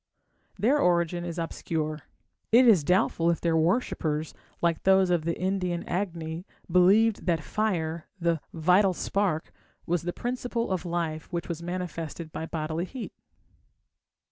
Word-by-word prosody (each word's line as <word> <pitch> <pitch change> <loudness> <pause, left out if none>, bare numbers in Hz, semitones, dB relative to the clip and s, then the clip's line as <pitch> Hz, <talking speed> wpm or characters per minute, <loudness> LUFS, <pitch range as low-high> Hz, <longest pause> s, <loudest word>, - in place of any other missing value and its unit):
Their 265 +8 +3
origin 175 - +2
is 170 -1 -5
obscure. 160 -2 -3 0.5
It 245 +3 +7
is 195 -10 +6
doubtful 170 0 +2
if 170 - +1
their 165 -1 +1
worshippers, 160 -3 0 0.3
like 170 -2 +1
those 190 -1 +4
of 170 -3 +1
the 170 - -1
Indian 180 -2 -1
Agni, 170 -2 -3 0.2
believed 200 +5 +4
that 165 -3 +1
fire, 170 -7 -1
the 165 -3 +1
"vital 180 +4 +3
spark", 185 -5 -1 0.3
was 175 -1 0
the 175 +1 -3
principle 245 0 -3
of 185 -1 -1
life 170 -2 -3
which 170 -1 -3
was 170 -1 -4
manifested 170 -2 -5
by 160 - -5
bodily 160 +1 -2
heat. 250 +4 -7
175 Hz, 140 wpm, -27 LUFS, 165-190 Hz, 0.5 s, It